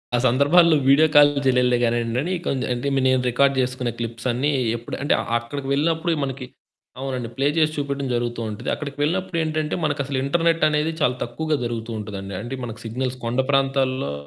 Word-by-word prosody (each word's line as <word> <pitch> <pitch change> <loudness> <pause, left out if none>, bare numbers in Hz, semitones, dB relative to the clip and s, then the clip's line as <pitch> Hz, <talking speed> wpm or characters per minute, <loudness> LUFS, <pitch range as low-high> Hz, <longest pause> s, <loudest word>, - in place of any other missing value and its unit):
ఆ - - +3
సందర్భాల్లో 150 +6 +5
వీడియో 150 +3 +6
కాలు 145 -1 +6
జేయలేదులే 125 -1 +3
గానియండి, 115 0 0
అని 175 +5 -3
కొంద్ 130 -3 -1
అంటే 120 +3 -3
మే 135 - +2
నేను 130 -1 +3
రికార్డ్ 135 +3 +3
జేసుకున్న 125 -1 -1
క్లిప్స్ 115 +1 -4
అన్ని 130 +5 0 0.3
ఎప్పుడు 115 - -7
అంటే 145 - +2 0.2
అక్కడికి 135 +4 -6
వెళ్ళినప్పుడే 165 +3 +1
మనకి 135 -1 -4 0.5
అవునండి. 130 -3 -4
ప్లే 135 +1 +1
చేసి 155 -1 +3
చూపెట్టడం 140 -1 -3
జరుగుతూ 120 -1 -2
ఉంటది. 105 +3 -5
అక్కడికి 140 -2 -6
వెళ్ళినప్పుడేంటంటే 160 -2 -1
మనకసలు 140 -2 -1
ఇంటర్నెట్ 165 +3 +1
అనేది 150 +2 0
చాలా 125 -2 +2
తక్కువగా 155 +6 -2
జరుగుతూ 115 -1 -4
ఉంటదండి. 100 -2 -6
అంటే 120 +3 -5
మనకు 115 -1 -6
సిగ్నల్స్ 125 +3 -3
కొండ 120 +3 -1
ప్రాంతాల్లో 135 - +1
135 Hz, 170 wpm, -22 LUFS, 120-145 Hz, 0.5 s, వీడియో